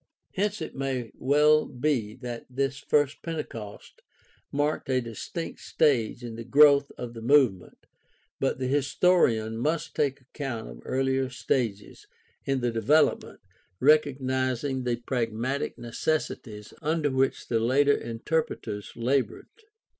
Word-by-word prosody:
Hence 205 -1 -1
it - - -7
may 130 -4 -3
well 150 +3 +3
be 125 -5 -1
that 120 -2 -7
this 135 +1 -2
first 145 -1 +1
Pentecost 120 -11 -7 0.5
marked 145 0 -1
a 130 -1 +3
distinct 120 +8 -6
stage 125 -5 +1
in 120 -1 -6
the 115 - -6
growth 140 +3 +5
of 120 -1 -6
the 115 - -8
movement, 120 -7 +2 0.5
but 135 - 0
the 130 - -3
historian 130 -5 +2
must 155 +6 -1
take 140 -2 0
account 130 -3 -5
of - - -10
earlier 135 0 0
stages 115 -5 -2 0.4
in 135 -1 0
the 120 -1 0
development, 145 +8 +2 0.4
recognizing 130 -2 +2
the 120 -1 +1
pragmatic 120 +2 -2
necessities 120 -3 -3
under 155 -1 0
which 130 0 0
the 115 - +1
later 140 +5 +3
interpreters 115 -4 -3
labored. 125 +3 -1
130 Hz, 125 wpm, -27 LUFS, 115-145 Hz, 0.5 s, growth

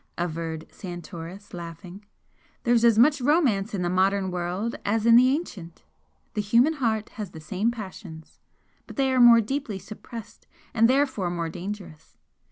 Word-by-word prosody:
averred 165 -2 -3
Santoris, 175 +1 -9
laughing. 175 +3 -9 0.6
"There's 235 -1 +3
as 230 -2 +5
much 285 +4 +5
romance 245 - +2
in 180 - -2
the - - 0
modern 190 +1 +1
world 180 +6 -3
as 220 +2 0
in 230 0 +7
the 250 +2 +7
ancient; 210 - -4 0.5
the 210 - -1
human 235 +9 +3
heart 225 -7 -1
has 210 -4 -4
the 160 - -11
same 195 +7 -1
passions, 190 -8 -9 0.5
but - - -10
they 270 -2 +1
are 255 - +4
more 235 -1 +8
deeply 240 -2 -3
suppressed 215 +2 -10 0.3
and 230 0 +4
therefore 260 -9 +1
more 170 -1 -3
dangerous. 175 -2 -8
205 Hz, 155 wpm, -25 LUFS, 175-235 Hz, 0.6 s, more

